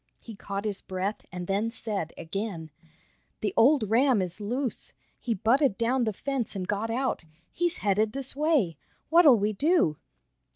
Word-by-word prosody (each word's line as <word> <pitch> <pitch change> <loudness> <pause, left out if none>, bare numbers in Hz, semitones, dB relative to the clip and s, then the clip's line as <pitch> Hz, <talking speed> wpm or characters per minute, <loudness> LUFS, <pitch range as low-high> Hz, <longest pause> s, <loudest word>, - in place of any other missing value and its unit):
He 225 - -10
caught 200 +1 -5
his 205 -2 -1
breath, 190 +3 -4
and 180 -1 -5
then 200 +4 0
said 215 -8 -3
again: 170 -3 -5 0.7
"The 210 - -1
old 260 -1 +4
ram 250 0 +4
is 180 +2 -3
loose! 245 +4 -3 0.3
He 235 -3 -2
butted 235 +3 +2
down 240 +2 +1
the 220 - 0
fence 265 -1 -3
and 185 -2 -4
got 205 +2 -1
out. 255 -4 -1 0.3
He's 350 0 -1
headed 210 +2 +2
this 270 -1 -2
way. 285 - +1 0.3
What'll 320 -7 +7
we 210 +1 0
do?" 290 - +2
220 Hz, 160 wpm, -27 LUFS, 195-265 Hz, 0.7 s, What'll